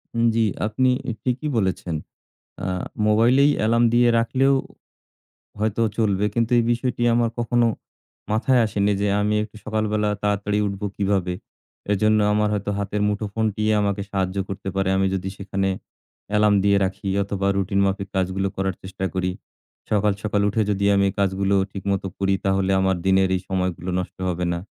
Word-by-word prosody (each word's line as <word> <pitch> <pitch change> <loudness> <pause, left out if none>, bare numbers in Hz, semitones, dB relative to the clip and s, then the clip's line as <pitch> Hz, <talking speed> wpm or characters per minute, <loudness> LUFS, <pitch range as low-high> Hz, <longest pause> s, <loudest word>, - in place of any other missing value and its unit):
উম 115 0 +2
জি। 115 - +3 0.2
আপনি 130 +4 +1 0.2
ই - - 0
ঠিকই 130 +4 -1
বলেছেন। 95 -4 -1 0.7
আ - - -2 0.4
মোবাইলেই 120 +7 +4
অ্যালার্ম 115 +2 +3
দিয়ে 120 0 +5
রাখলেও 135 +4 +2 1.0
হয়তো 110 +1 0 0.2
চলবে। 100 -2 +1
কিন্তু 115 0 +1
এই 120 - +3
বিষয়টি 125 0 -2
আমার 120 -1 +2
কখনো 120 0 +2 0.7
মাথায় 120 +3 +3
আসেনি 100 0 +1
যে 100 - +1
আমি 105 +1 +1
একটু 110 0 -9
সকালবেলা 110 -1 0
তাড়াতাড়ি 105 0 0
উঠবো 100 +1 -3
কিভাবে। 95 -3 0 0.6
এজন্য 110 +2 +3
আমার 105 0 +2
হয়তো 100 0 -2
হাতের 100 +1 -2
মুঠোফোনটিই 105 +1 -1
আমাকে 100 -1 0
সাহায্য 95 -1 -1
করতে 95 0 -5
পারে। 95 -1 +1
আমি 95 0 +2
যদি 95 0 -3
সেখানে 95 0 -2 0.6
অ্যালার্ম 105 -1 +4
দিয়ে 100 0 +4
রাখি 95 +1 -4
অথবা, 100 0 -2
রুটিন 100 +1 0
মাফিক 100 0 -2
কাজগুলো 95 +1 0
করার 95 -1 -1
চেষ্টা 95 0 -6
করি। 90 0 0 0.6
সকাল, 105 -1 +2
সকাল 105 -1 0
উঠে 110 +2 +1
যদি 100 0 0
আমি 100 0 +3
এই 95 - -4
কাজগুলো 100 0 +1 0.2
ঠিক 100 - -6
মতো 95 0 -2
করি, 95 0 +1
তাহলে 95 0 +1
আমার 95 0 +2
দিনের 95 0 +4
এই - - -3
সময়গুলো 90 -1 -2
নষ্ট 90 - -5
হবে 90 0 -1
না। 85 - -2
100 Hz, 165 wpm, -23 LUFS, 95-110 Hz, 1.0 s, দিয়ে